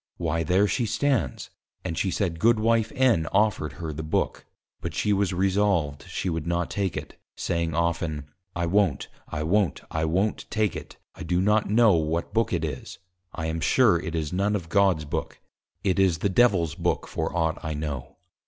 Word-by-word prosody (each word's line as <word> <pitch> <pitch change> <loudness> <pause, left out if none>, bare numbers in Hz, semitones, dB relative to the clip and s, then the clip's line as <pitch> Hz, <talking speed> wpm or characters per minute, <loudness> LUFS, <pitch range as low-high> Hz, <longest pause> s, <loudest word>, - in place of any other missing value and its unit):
Why 80 -1 -1
there 90 +5 +3
she 120 +3 0
stands!_ 130 - 0 0.4
And 80 - -2
she 95 - 0
said, 85 -2 -1
Goodw. 115 +2 +3 0.3
N. 120 -11 +3
offered 105 -8 +1
her 80 -4 -5
THE 75 - -5
BOOK, 80 0 -2 0.3
but - - -5
she 105 - +1
was 100 -2 +1
resolved 95 -6 +1
she - - -3
would 80 -2 -2
not 85 -1 -1
take 100 -4 -1
it, - - -8 0.2
saying 85 -2 -1
often, 85 -3 -1 0.3
_I 85 0 -1
wont, 90 -6 +1 0.2
I 75 0 -3
wont, 95 +3 +1
I 80 0 0
wont 95 +7 0
take 110 -4 0
it, - - -8 0.2
I - - -12
do 90 0 0
not 105 +2 +2
know 110 0 +5
what 80 0 -1
Book 115 0 +1
it 85 -3 0
is: 75 -5 -6 0.4
I 80 - -3
am 80 +1 -2
sure 105 -1 +4
it 85 0 -5
is 80 -1 -2
none 100 +3 +1
of 85 -5 -4
God's 95 -4 +3
Book, 75 - -4 0.4
it 95 -1 +1
is 95 -4 +3
the 100 - 0
Devil's 95 -7 +3
Book - - -1
for 80 - -2
ought 80 -1 0
I 80 -1 -3
know. 75 -4 -5
85 Hz, 190 wpm, -26 LUFS, 80-100 Hz, 0.4 s, know